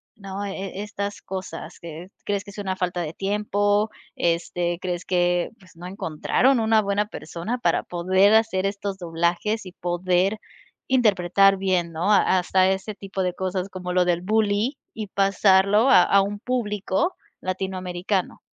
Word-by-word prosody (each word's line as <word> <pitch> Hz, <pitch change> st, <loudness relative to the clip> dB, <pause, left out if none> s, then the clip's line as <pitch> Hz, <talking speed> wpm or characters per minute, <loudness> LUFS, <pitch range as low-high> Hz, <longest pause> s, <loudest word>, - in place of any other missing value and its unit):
no? 195 Hz, -1 st, -6 dB
Eh, 195 Hz, -1 st, -5 dB
e -, -, -2 dB
estas 205 Hz, -1 st, -5 dB
cosas, 185 Hz, -3 st, -7 dB
que 170 Hz, +1 st, -9 dB, 0.2 s
¿crees, 200 Hz, -1 st, -1 dB
que -, -, -12 dB
es 195 Hz, -, -14 dB
una 195 Hz, -2 st, -2 dB
falta 180 Hz, -1 st, -2 dB
de 160 Hz, -2 st, -4 dB
tiempo? 205 Hz, +2 st, 0 dB, 0.2 s
Este, 170 Hz, +1 st, -1 dB
¿crees 180 Hz, -1 st, -3 dB
que, 175 Hz, -1 st, +1 dB
pues, 185 Hz, -3 st, -19 dB
no 175 Hz, +2 st, -10 dB
encontraron 195 Hz, -, +1 dB
una 220 Hz, -1 st, +3 dB
buena 200 Hz, +1 st, 0 dB
persona 210 Hz, +4 st, -5 dB
para 170 Hz, -8 st, +1 dB
poder 185 Hz, +4 st, +3 dB
hacer 220 Hz, -4 st, +3 dB
estos 200 Hz, -1 st, -3 dB
doblajes 175 Hz, +5 st, -1 dB
y 180 Hz, -, -10 dB
poder 180 Hz, +3 st, 0 dB, 0.5 s
interpretar 195 Hz, -5 st, +4 dB
bien, 185 Hz, -3 st, 0 dB
¿no?, 180 Hz, +6 st, 0 dB
ha 190 Hz, -2 st, +4 dB
hasta 185 Hz, +1 st, +3 dB
ese 195 Hz, +3 st, -3 dB
tipo 195 Hz, -1 st, -5 dB
de 180 Hz, -, -1 dB
cosas 185 Hz, +1 st, -3 dB
como 180 Hz, -1 st, -5 dB
lo 180 Hz, -1 st, +3 dB
del 175 Hz, -1 st, +1 dB
bully 215 Hz, +6 st, +1 dB, 0.2 s
y 215 Hz, -1 st, -5 dB
pasarlo 195 Hz, +3 st, +3 dB
a 225 Hz, -, +8 dB
a 200 Hz, -, +4 dB
un 205 Hz, +1 st, -3 dB
público 220 Hz, -, -1 dB, 0.3 s
latinoamericano? 185 Hz, 0 st, -3 dB
190 Hz, 160 wpm, -24 LUFS, 180-205 Hz, 0.5 s, a